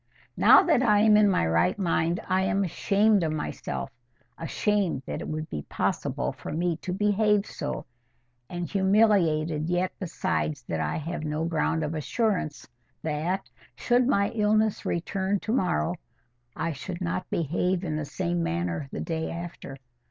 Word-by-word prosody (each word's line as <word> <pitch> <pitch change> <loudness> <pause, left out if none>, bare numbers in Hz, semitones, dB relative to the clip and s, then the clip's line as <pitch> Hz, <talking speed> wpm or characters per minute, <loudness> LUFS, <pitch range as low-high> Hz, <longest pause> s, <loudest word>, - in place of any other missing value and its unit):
Now - - +7
that 335 -8 +3
I 210 -5 +4
am 215 -1 +6
in 210 -1 +5
my 185 - +2
right 85 - +2
mind, 170 -2 0
I 185 +1 +2
am 195 +1 +1
ashamed 200 +3 +2
of 160 -2 0
myself, 150 -2 -4 0.4
ashamed 185 -2 0
that - - -4
it - - -5
should 155 0 -3
be 75 - -3
possible - - -1
for - - -8
me 170 0 0
to 180 - -5
behave 210 +1 +2
so, - - -5 0.6
and 175 -1 -4
humiliated 185 -6 +2
yet 180 +1 +1
besides 165 -6 -2
that 80 -8 -3
I - - -1
have 165 +1 -4
no 155 +1 -2
ground 165 -1 0
of 150 +1 -2
assurance 160 - -1 0.4
that, 160 +5 -2 0.3
should 245 0 +2
my 200 -6 +2
illness 215 -1 +1
return 190 +3 -1
to 220 - -3
morrow, 130 - +1 0.6
I 165 - -1
should 175 +3 -6
not 185 +1 -2
behave 175 +3 0
in 160 -4 -2
the 155 -1 -2
same 85 -9 -2
manner 85 +7 -2
the - - -4
day 160 -1 -2
after. 170 -5 -7
175 Hz, 160 wpm, -27 LUFS, 155-200 Hz, 0.6 s, Now